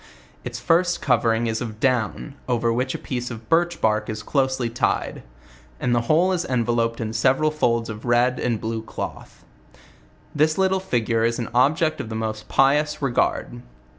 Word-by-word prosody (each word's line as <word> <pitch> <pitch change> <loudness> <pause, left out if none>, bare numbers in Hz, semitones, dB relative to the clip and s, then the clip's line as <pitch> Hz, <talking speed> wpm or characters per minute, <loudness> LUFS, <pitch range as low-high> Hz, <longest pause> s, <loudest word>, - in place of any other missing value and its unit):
Its - - -5
first 175 +1 +2
covering 115 -3 +2
is 115 0 -2
of 110 -3 -6
down, 130 +2 0 0.2
.over 115 -1 +1
which 130 +2 -1
a - - -2
piece 125 -1 -4
of 115 -2 -9
birch 175 +1 +2
bark 105 -1 +1
is 110 -1 -5
closely 130 -3 0
tied; 115 +1 -1 0.6
and 125 - 0
the 120 - +2
whole 175 +5 +4
is 180 -2 0
enveloped 115 -3 0
in 110 -1 -3
several 135 +6 +2
folds 115 -6 0
of 110 0 -7
red 120 +1 +2
and 115 -3 -1
blue 110 +1 -3
cloth. 110 - -8 0.9
..This 155 +1 +2
little 190 0 +2
<figue 120 -10 0
is 115 0 +1
an 120 - -4
object 155 +6 +2
of 110 - -8
the 110 - -5
most 110 -1 -4
pious 150 +3 +2
regard. 120 - -1
120 Hz, 170 wpm, -23 LUFS, 115-150 Hz, 0.9 s, whole